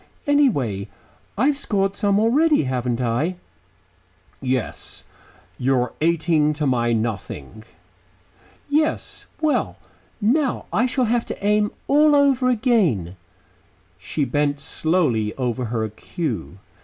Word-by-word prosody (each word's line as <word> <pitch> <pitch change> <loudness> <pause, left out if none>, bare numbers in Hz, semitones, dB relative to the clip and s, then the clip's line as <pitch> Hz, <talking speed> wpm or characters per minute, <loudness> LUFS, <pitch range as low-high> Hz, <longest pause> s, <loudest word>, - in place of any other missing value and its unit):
Anyhow, 145 - +2 0.5
I 235 - +2
have 285 -1 +2
scored 195 -6 0
some 200 0 +1
already, 290 - +3
haven't 125 -2 -1
I?" 125 +9 0 1.1
"Yes. 130 -4 -2 0.6
You're 125 -2 +1
eighteen 160 -2 +2
to 150 0 -2
my 120 -3 +1
nothing." 110 - -4 1.0
"Yes. 305 +2 -1
Well, 310 -2 0 0.4
now 255 +5 +1
I 245 +4 +3
shall 255 0 0
have 235 +1 0
to 200 - -6
aim 210 0 +3 0.2
all 295 +1 +5
over 275 -3 +3
again." 200 - +1 0.8
She 150 - -2
bent 145 0 0
slowly 140 -10 0
over 125 -1 -2
her 110 -1 -2
cue. 105 - -5
160 Hz, 110 wpm, -22 LUFS, -, 1.1 s, all